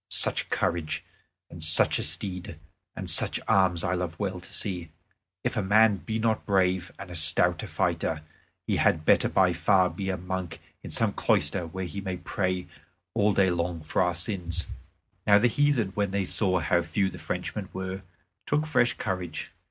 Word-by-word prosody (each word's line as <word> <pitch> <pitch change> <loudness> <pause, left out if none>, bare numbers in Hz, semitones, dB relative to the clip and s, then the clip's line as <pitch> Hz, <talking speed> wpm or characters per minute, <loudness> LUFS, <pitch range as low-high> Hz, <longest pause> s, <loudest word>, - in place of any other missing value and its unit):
Such - - +2
courage, 85 -2 -1 0.5
and 85 -1 -7
such 80 0 +5
a - - -2
steed, 90 -4 -2 0.4
and - - -6
such - - +3
arms 90 -3 +3
I 85 - 0
love 90 -2 -3
well 95 -3 -2
to 90 - -15
see. 90 -5 -3 0.5
If - - -1
a 110 - +1
man 105 +1 +4
be 110 +4 -4
not 110 0 0
brave 95 -2 +1
and 95 -2 -9
a - - -7
stout 80 -2 +4
fighter, 80 -1 -1 0.4
he - - 0
had 80 -2 +2
better - - +4
by 95 -2 +3
far 90 +2 +3
be 95 -2 -4
a 95 - -1
monk 90 -1 -5 0.2
in - - -8
some - - 0
cloister 90 -2 +1
where 95 +3 -5
he 90 +4 -6
may 95 -2 -4
pray 90 +1 -2 0.5
all 105 +1 +3
day 95 -2 +3
long 85 -1 -2
for 75 - 0
our 90 -1 +1
sins." 90 -2 -2 0.6
Now 100 -1 +7
the 115 +4 +4
heathen, 135 -4 +2
when 100 +1 -1
they 100 0 -1
saw 95 -1 +1
how 85 +1 +2
few 85 +4 0
the 90 - -10
Frenchmen 95 +2 -4
were, 95 +1 -5 0.5
took 150 +1 +1
fresh 125 -6 +2
courage. 90 -5 -4
95 Hz, 180 wpm, -27 LUFS, 85-100 Hz, 0.6 s, Now